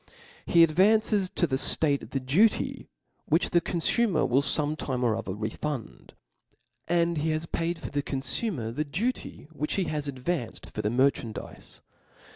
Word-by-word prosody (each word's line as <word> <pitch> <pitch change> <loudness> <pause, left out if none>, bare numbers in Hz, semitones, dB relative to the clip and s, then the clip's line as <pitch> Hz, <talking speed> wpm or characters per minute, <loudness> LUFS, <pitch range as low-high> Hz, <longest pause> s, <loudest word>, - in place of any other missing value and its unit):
He 170 -1 +6
advances 195 +4 +3
to 175 - +1
the 135 -5 0
ftate 140 +1 +1
the 135 - -1
duty, 160 - +2 0.4
which 160 +4 +1
the 175 - +4
confumer 175 +2 +1
will 130 +3 +3
fome 150 +1 0
time 130 -5 -3
or 115 -3 +2
other 105 -4 -4
refund; 115 +4 -5 0.7
and 170 -1 +2
he 160 +2 0
has 155 +1 -1
paid 165 +1 -2
for - - -7
the 145 - 0
confumer 135 - -3
the 150 - 0
duty 195 - -3
which 150 -1 -3
he 195 - +1
has 150 -3 -3
advanced 130 -1 -4
for 105 - -3
the 105 - 0
merchandize. 120 -3 -1
150 Hz, 155 wpm, -27 LUFS, 130-175 Hz, 0.7 s, He